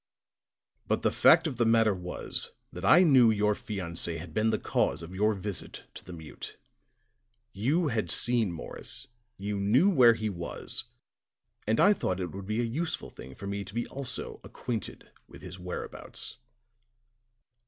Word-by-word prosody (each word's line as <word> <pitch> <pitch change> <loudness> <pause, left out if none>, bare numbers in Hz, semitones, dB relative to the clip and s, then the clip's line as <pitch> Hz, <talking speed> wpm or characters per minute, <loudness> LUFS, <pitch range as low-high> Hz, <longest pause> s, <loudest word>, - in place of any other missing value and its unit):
"But - - 0
the - - +3
fact 165 +1 +6
of 140 -7 -2
the 120 - +3
matter 115 -2 +4
was 90 -1 -2 0.2
that 90 - -7
I 175 - +7
knew 130 -8 +6
your 105 -1 +2
fiancé 85 -5 -3
had 80 -1 -9
been 110 +4 +2
the 110 - +1
cause 85 - 0
of 85 +3 -9
your 105 +3 +2
visit 100 -1 -5
to - - -10
the 90 - -11
mute. 80 -4 -9 1.0
You 145 - +1
had 115 -4 -1
seen 120 -5 +2
Morris, 85 - -7 0.3
you 100 +1 -3
knew 125 - +4
where 125 -8 +6
he 110 -1 -2
was, 85 -5 -3 0.8
and 110 +1 +2
I 205 - +7
thought 95 - -2
it 90 -3 -3
would 95 0 -8
be 110 +3 0
a 115 0 -3
useful 165 - -4
thing 65 0 -11
for - - -9
me 100 0 -3
to 95 +2 -12
be 120 - -1
also 135 -2 -5
acquainted 115 -5 -6 0.2
with - - -14
his 95 - -8
whereabouts." 90 +5 -5
105 Hz, 165 wpm, -29 LUFS, 90-120 Hz, 1.0 s, I